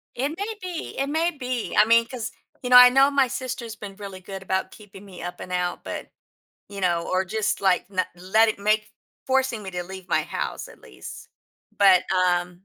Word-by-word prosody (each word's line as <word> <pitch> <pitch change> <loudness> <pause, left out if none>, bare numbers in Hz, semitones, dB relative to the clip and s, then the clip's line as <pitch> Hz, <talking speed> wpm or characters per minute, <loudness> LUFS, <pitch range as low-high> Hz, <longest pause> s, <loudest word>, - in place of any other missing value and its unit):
It 270 +4 -1
may 405 +7 -5
be, 360 -3 -6
it 275 +1 0
may 330 +3 +1
be, 255 -5 -4
I 210 - +7
mean, 230 +1 +5
'cause 245 -3 -5 0.3
you 250 - -3
know, 250 - +6
I 250 0 +11
know 270 +2 +5
my 275 -2 +3
sister's 245 -3 -5
been 200 -2 -9
really 195 -2 -8
good 190 +1 -8
about 190 0 -2
keeping 205 -1 -14
me 185 -3 -11
up 175 0 -6
and - - -8
out, 180 0 -2
but, - - -6 0.6
you 200 -1 -7
know, 170 -2 0
or 185 0 +1
just, 215 +3 -2
like, 190 -2 +2
na 185 -1 0
letti 215 +5 +2
maki 215 +1 +1 0.4
forcing 260 -4 +1
me 190 - -7
to 180 0 -3
leave 190 0 -10
my - - +2
house, - - -5
at - - -16
least, - - -11 0.5
but, 195 -3 +6
um 180 -1 +2
210 Hz, 205 wpm, -24 LUFS, 185-255 Hz, 0.6 s, I